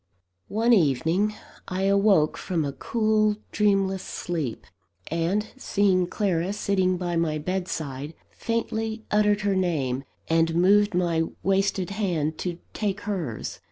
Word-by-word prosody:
One 230 +3 +2
evening 170 - +2 0.3
I 185 +1 -2
awoke 195 -5 +4
from 165 -5 -2
a 140 - -3
cool, 215 +4 +1 0.2
dreamless 195 -2 +2
sleep; 160 -12 -4 0.5
and, 170 +6 0
seeing 195 -7 +2
Clara 185 -1 0
sitting 190 -3 +1
by 175 -1 -2
my 165 -2 +1
bedside, 155 -4 -4 0.2
faintly 225 -1 -3
uttered 210 0 +3
her 200 -2 +1
name, 140 -8 0 0.2
and 165 0 +2
moved 205 +3 +4
my 170 -2 +1 0.2
wasted 195 -1 +1
hand 170 -7 -1
to 175 -2 -3 0.2
take 200 -2 -2
hers. 175 - -4
185 Hz, 120 wpm, -25 LUFS, 165-205 Hz, 0.5 s, awoke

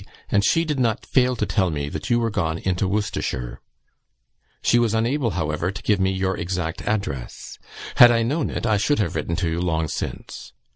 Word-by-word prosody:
and 100 0 +3
she 165 +10 +3
did 150 -4 -2
not 115 -4 0
fail 125 -1 +2
to 110 - -1
tell 95 -3 +1
me 75 -3 -3
that 75 +1 -5
you 120 -1 +3
were 115 -1 0
gone 80 -6 -1
into 95 +2 -1
Worcestershire; 90 - -3 1.0
she 120 - +4
was 115 -2 +1
unable, 120 +3 +1
however, 80 +2 -1
to 100 - -7
give 105 -2 +2
me 95 0 +2
your 95 0 -1
exact 85 -1 -3
address. 100 - -4 0.4
Had 120 - +10
I 115 -1 +2
known 145 +6 -1
it, - - -4
I 110 -3 +3
should 145 +9 +1
have 105 - -1
written 80 +1 -2
to 90 - -1
you 80 +1 -1
long 80 -3 0
since. - - -6
100 Hz, 200 wpm, -23 LUFS, 85-115 Hz, 1.0 s, Had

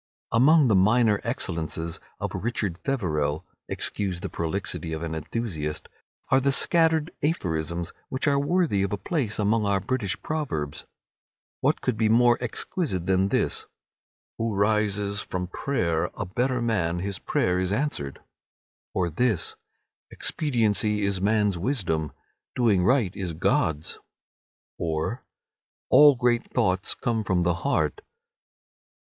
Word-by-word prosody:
Among 145 +5 +5
the 110 - +3
minor 105 +2 +4
excellences 85 - -3 0.2
of - - -3
"Richard 105 -6 -2
Feverel"—excuse 90 - -2
the 100 - -4
prolixity 85 -1 -3
of 80 +1 -4
an 80 -1 -3
enthusiast—are 80 - -3
the 140 +1 +2
scattered 160 +2 +4
aphorisms 85 - -2 0.2
which 130 +3 -2
are 140 -1 +3
worthy 155 - +1
of 100 - -1
a 105 - -1
place 115 - -2
among 105 0 +1
our 100 -1 +2
British 110 -2 -2
proverbs. 85 - -3 0.7
What - - +1
could 125 -4 -1
be 110 -1 +2
more 120 +1 +5
exquisite 120 - -2
than 95 +1 +2
this, - - -1 0.7
"Who 115 -2 -1
rises 100 0 +1
from 90 -1 -4
prayer 85 - -1
a - - -3
better 125 +6 -1
man 90 -8 0
his 100 -2 -4
prayer 90 0 0
is 95 0 0
answered"; 105 - -2 0.7
or 90 -2 +1
this, 105 -1 0 0.5
"Expediency 110 -7 0
is 100 -2 0
man's 105 -2 +2
wisdom. 85 - -1 0.4
Doing 110 -7 +3
right 115 -3 +2
is 90 -4 -4
God's"; 80 -1 0 0.8
or, 80 +9 -2 0.7
"All 145 -1 +8
great 120 -1 +1
thoughts 95 -6 +1
come 115 -2 -1
from 95 -3 +1
the 85 0 +2
heart"? 140 - 0
100 Hz, 125 wpm, -26 LUFS, 90-125 Hz, 0.8 s, All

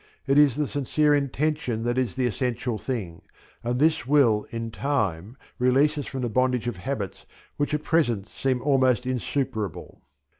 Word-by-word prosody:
It 135 +1 +4
is 145 -5 +5
the 150 0 0
sincere 145 +2 +1
intention 140 -4 0
that 120 0 0
is 130 -2 -1
the 130 -1 0
essential 120 0 -2
thing, 100 -11 -4 0.4
and 120 +1 -1
this 155 -1 +2
will 125 -7 +3
in 115 -1 -5
time 110 - -2 0.2
release 135 +5 +3
us 145 - -4
from 130 - -5
the - - 0
bondage 125 +1 +1
of 120 -6 -3
habits 105 -2 -5 0.3
which 145 +1 0
at 150 - -3
present 120 -13 +1
seem 130 -2 -2
almost 130 -3 +3
insuperable. 125 - -3
130 Hz, 160 wpm, -25 LUFS, 115-145 Hz, 0.4 s, is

